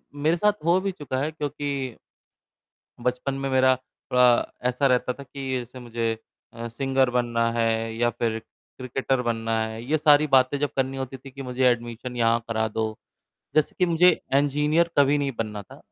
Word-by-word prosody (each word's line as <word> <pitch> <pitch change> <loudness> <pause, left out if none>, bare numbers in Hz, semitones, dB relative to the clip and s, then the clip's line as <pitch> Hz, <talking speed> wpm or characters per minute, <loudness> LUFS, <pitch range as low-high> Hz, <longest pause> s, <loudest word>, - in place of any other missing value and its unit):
मेरे 155 +3 +2
साथ 210 +4 +3
हो 175 +2 +4
भी 195 0 -1
चुका 145 -8 -5
है 150 +3 -1
क्योंकि 145 -2 -4 1.3
बचपन 125 +3 -1
में 135 0 -3
मेरा 130 0 +4
थोड़ा 125 -1 +2 0.2
ऐसा 125 +3 +1
रहता 125 -1 +2
था 140 - -11
कि 135 0 -7
जैसे 125 +1 -8
मुझे 115 -2 -2 0.4
अ, 115 0 -5
सिंगर 135 +2 +1
बनना 120 -1 +1
है 115 -1 0
या 120 +1 +2
फिर 115 -1 -2
क्रिकेटर 130 +3 -4
बनना 115 -1 -2
है। 110 0 -4
ये 150 +5 +1
सारी 150 0 +5
बातें 130 +1 +4
जब 145 0 0
करनी 135 0 0
होती 135 0 -5
थी 135 +1 -13
कि 135 +1 -8
मुझे 130 0 -1
एडमिशन 120 +1 -3
यहाँ 115 0 +3
करा 110 -1 0
दो। 110 +1 -2 0.7
जैसे 155 -1 +2
कि 180 - +3
मुझे 170 +1 +5 0.3
इंजीनियर 150 +4 +2
कभी 145 +1 +5
नहीं 140 -1 -1
बनना 105 -2 -3
था, - - -15
130 Hz, 175 wpm, -25 LUFS, 120-145 Hz, 1.3 s, सारी